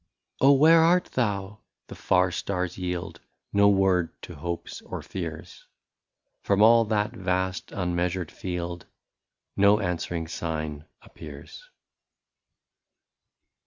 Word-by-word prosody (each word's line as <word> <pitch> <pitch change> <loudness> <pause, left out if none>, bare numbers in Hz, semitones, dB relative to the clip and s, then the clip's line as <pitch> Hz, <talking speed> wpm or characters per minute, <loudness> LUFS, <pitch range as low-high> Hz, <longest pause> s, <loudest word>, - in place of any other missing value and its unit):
Oh! 140 +1 +6
where 160 +4 +6
art 175 +2 +3
thou 105 -3 -2
'' - - -58
— - - -58
the - - -7
far 90 0 +2
stars 90 -1 -3
yield 90 -1 -5 0.3
No 100 0 +5
word 95 -4 +1
to - - -8
hopes 85 -1 -6
or - - -7
fears; 80 -4 -7 0.8
From 100 +1 +3
all 115 +1 +6
that 105 0 0
vast 95 -4 -2
unmeasured 90 -1 -2
field 85 -1 -5 0.7
No 100 +1 +5
answering 85 -3 -3
sign 80 -3 -4 0.2
appears. - - -12
95 Hz, 115 wpm, -26 LUFS, 85-105 Hz, 0.8 s, Oh